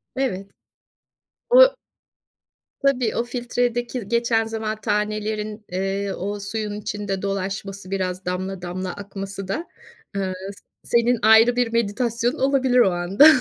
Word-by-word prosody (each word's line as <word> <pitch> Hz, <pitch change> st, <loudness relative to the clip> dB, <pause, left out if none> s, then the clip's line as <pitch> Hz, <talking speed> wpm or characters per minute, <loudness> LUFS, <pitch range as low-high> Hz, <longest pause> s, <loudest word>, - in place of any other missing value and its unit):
Evet. 200 Hz, -8 st, -2 dB, 1.0 s
O -, -, +7 dB, 1.0 s
Tabii, 255 Hz, -5 st, +1 dB
o 235 Hz, -, +1 dB
filtredeki 240 Hz, -1 st, -2 dB
geçen 235 Hz, -1 st, +2 dB
zaman, 220 Hz, -1 st, -4 dB
tanelerin, 210 Hz, +1 st, -2 dB
eee, 195 Hz, +1 st, -1 dB
o 205 Hz, +3 st, -4 dB
suyun 205 Hz, +1 st, -4 dB
içinde 205 Hz, -2 st, -3 dB
dolaşması, 195 Hz, 0 st, -4 dB
biraz 185 Hz, -1 st, -2 dB
damla 185 Hz, +1 st, -3 dB
damla 180 Hz, +1 st, -4 dB
akması 195 Hz, -1 st, -7 dB
da, 315 Hz, -, -3 dB, 0.5 s
ııı, 190 Hz, -1 st, -1 dB, 0.5 s
senin 235 Hz, 0 st, +2 dB
ayrı 220 Hz, +3 st, +6 dB
bir 240 Hz, -2 st, 0 dB
meditasyonun 235 Hz, +3 st, 0 dB
olabilir 265 Hz, -2 st, +3 dB
o 195 Hz, -6 st, +5 dB
anda. 180 Hz, -, +5 dB
210 Hz, 115 wpm, -23 LUFS, 195-240 Hz, 1.0 s, O